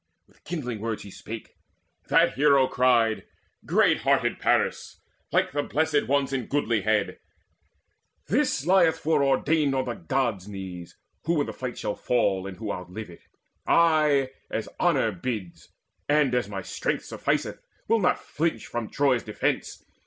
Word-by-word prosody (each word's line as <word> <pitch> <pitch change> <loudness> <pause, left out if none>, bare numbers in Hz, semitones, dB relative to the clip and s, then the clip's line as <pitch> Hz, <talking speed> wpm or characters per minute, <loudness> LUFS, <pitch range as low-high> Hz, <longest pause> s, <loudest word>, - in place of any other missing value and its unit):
With - - -29
kindling 125 -10 -4
words 110 0 -3
he 100 - -11
spake. 110 +3 -8 0.6
That - - +4
hero 140 -1 +4
cried: 120 -4 +2 0.4
"Great - - +3
hearted - - +1
Paris, - - 0 0.3
like - - +2
the 145 - 0
Blessed 150 0 0
Ones 140 0 +1
In 130 -4 -2
goodlihead, 110 -7 0 1.1
this 135 - +1
lieth 175 -2 +4
foreordained 145 -1 +2
On 130 -1 0
the 120 - -2
Gods' 110 -1 -2
knees, 95 -4 -8 0.3
who 165 -2 +2
in - - 0
the - - -6
fight 125 -2 -5
shall 105 - -2
fall, 100 -6 0
And 95 -2 -8
who 110 -2 -4
outlive 90 +3 -7
it. 85 - -15 0.5
I, 150 -5 +4 0.2
as 110 - -3
honour 140 -10 +2
bids, 100 -2 -5 0.4
And 145 -3 +3
as 125 -5 0
my 95 -2 -5
strength - - -2
sufficeth, - - -2 0.3
will 230 +1 +3
not 180 - +2
flinch 165 +2 -2
From 120 -2 -4
Troy's 135 -4 +2
defence. 105 - -3
125 Hz, 145 wpm, -26 LUFS, 105-145 Hz, 1.1 s, That